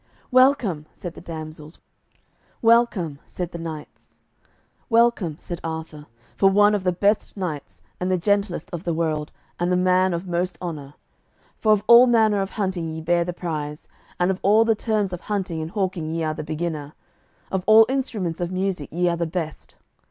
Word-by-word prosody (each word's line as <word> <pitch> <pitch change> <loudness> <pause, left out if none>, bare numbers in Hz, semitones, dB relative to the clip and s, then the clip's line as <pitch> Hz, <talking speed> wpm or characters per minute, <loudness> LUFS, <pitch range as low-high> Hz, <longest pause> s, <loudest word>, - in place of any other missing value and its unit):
"Welcome," 250 - +3
said 175 -4 -7
the - - -11
damsels; 155 -2 -8 0.9
"Welcome," 225 -10 +3
said 175 -2 -5
the 170 - -7
knights; 160 -2 -9 0.7
"Welcome," 225 -9 +2
said 175 -2 -7
Arthur, 160 -2 -6 0.3
"for 195 - +4
one 205 +2 +5
of 205 -2 0
the 180 - +2
best 200 +4 0
knights 165 -7 -5 0.2
and 180 - -1
the 185 - +2
gentlest 200 -2 0
of 170 0 -4
the 170 -3 -1
world, 155 -2 -1 0.3
and 175 +1 0
the 180 - +3
man 185 0 +3
of 170 +3 -5
most 175 -1 -1
honour. 150 -5 -6 0.6
For 215 - +3
of 210 -1 +3
all 235 +2 +8
manner 220 -4 +3
of 195 - -2
hunting 190 -6 -2
ye 160 0 -5
bear 170 +2 +1
the 180 - -3
prize; 155 -4 -5 0.3
and 180 +1 +3
of 190 - -4
all 215 +3 +5
the 225 - +4
terms 215 -3 -1
of 180 - -5
hunting 190 -6 -3
and 160 - -4
hawking 185 -4 -2
ye 165 +1 -2
are 155 -1 -1
the 155 - -6
beginner; 155 -1 -4 0.6
of 190 -1 -1
all 220 +1 +8
instruments 215 -11 -2
of 175 0 -2
music 185 -5 -2
ye 175 +2 0
are 170 -1 +1
the 170 0 -1
best. 160 -2 -5
180 Hz, 180 wpm, -23 LUFS, 160-200 Hz, 0.9 s, all